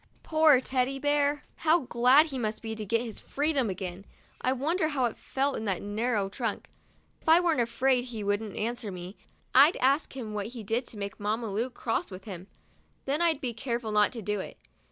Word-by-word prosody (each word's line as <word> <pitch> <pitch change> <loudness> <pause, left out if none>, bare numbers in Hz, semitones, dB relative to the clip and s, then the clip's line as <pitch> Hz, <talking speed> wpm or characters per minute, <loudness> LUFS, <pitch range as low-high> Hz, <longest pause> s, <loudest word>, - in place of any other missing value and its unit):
Poor 310 -4 +5
Teddy 260 +1 0
Bear, 290 +1 +1
how 325 +1 +3
glad 255 +5 +5
he 275 -5 -5
must 215 -1 -3
be 225 0 -3
to 220 -1 -5
get 230 +3 +2
his 225 -3 -6
freedom 285 -5 0
again! 185 0 -5 0.4
I 255 - +1
wonder 310 +6 0
how 280 -5 0
it 235 - -2
felt 275 +1 -1
in 220 - -4
that 195 -4 -1
narrow 210 0 0
trunk. 220 +2 -4 0.5
If - - -3
I 325 +2 +8
weren't 335 -7 +2
afraid 250 +1 +1
he 230 -4 -6
wouldn't 205 0 -1
answer 230 -1 -2
me, 180 +2 -8 0.4
I'd 280 +6 +7
ask 270 +1 +1
him 220 -5 -5
what 205 -1 -3
he 225 - -6
did 230 +4 -1
to 220 - -8
make 200 -1 -5
Mamma 215 +1 -2
Lu 225 +6 -1
cross 235 -2 -2
with 190 -1 -9
him; 190 -3 -8 0.6
then 285 +4 0
I'd 325 -4 +2
be 250 -4 -2
careful 235 -1 -3
not 210 0 +4
to 230 -3 -6
do 210 +1 -1
it. - - -7
240 Hz, 205 wpm, -28 LUFS, 210-275 Hz, 0.6 s, I